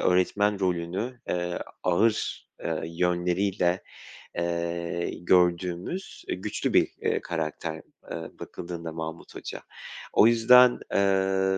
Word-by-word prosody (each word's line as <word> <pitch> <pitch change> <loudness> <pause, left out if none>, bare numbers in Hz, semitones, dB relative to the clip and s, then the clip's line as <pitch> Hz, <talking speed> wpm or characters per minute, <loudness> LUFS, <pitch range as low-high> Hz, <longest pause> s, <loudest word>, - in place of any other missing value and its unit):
öğretmen 100 +3 +2
rolünü, 95 +7 -2
eee, 90 0 -1 0.2
ağır, 105 +5 +1 0.2
eee, 80 -1 -1
yönleriyle, 90 +2 +1 0.6
eee, 85 0 -2
gördüğümüz, 90 - +1
eee, - - -1
güçlü 100 +3 -2
bir, - - +5
eee, - - +1
karakter, 80 -1 -3 0.4
eee, 80 -1 -5
bakıldığında 85 -2 -6
Mahmut 80 +1 -7
Hoca. - - -6 0.5
O 110 - +7
yüzden, 125 +2 +7
eee, 95 -1 +2
90 Hz, 105 wpm, -27 LUFS, 85-100 Hz, 0.6 s, O